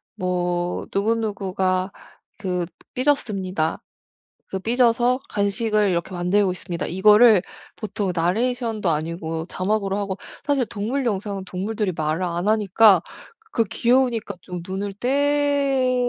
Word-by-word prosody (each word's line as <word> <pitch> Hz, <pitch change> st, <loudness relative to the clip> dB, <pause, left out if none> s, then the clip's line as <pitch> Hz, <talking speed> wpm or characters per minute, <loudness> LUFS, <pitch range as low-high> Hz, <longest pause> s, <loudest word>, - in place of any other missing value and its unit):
뭐 180 Hz, -1 st, -1 dB
누구누구가 195 Hz, -3 st, 0 dB, 0.5 s
그 180 Hz, -4 st, -1 dB, 0.3 s
삐졌습니다. 195 Hz, -, 0 dB, 0.7 s
그 190 Hz, -, -3 dB
삐져서 245 Hz, +3 st, +2 dB
간식을 210 Hz, 0 st, +1 dB
이렇게 170 Hz, +1 st, -2 dB
만들고 185 Hz, +2 st, +2 dB
있습니다.' 180 Hz, -1 st, -5 dB
이거를 210 Hz, +2 st, +6 dB, 0.3 s
보통 205 Hz, -3 st, -3 dB
나레이션도 220 Hz, +3 st, 0 dB
아니고 160 Hz, +1 st, -3 dB
자막으로 195 Hz, +1 st, -1 dB
하고 200 Hz, -2 st, -3 dB, 0.3 s
사실 280 Hz, -4 st, +2 dB
동물 230 Hz, +6 st, -2 dB
영상은 200 Hz, -2 st, -2 dB
동물들이 200 Hz, +2 st, -2 dB
말을 155 Hz, +2 st, -1 dB
안 175 Hz, +1 st, -2 dB
하니까 210 Hz, -3 st, +5 dB, 0.5 s
그 230 Hz, -, +2 dB
귀여우니까 235 Hz, -2 st, +1 dB
좀 180 Hz, -1 st, -6 dB
눈을 195 Hz, +2 st, -3 dB, 0.4 s
떼 280 Hz, -3 st, +2 dB
200 Hz, 280 characters per minute, -23 LUFS, 180-230 Hz, 0.7 s, 이거를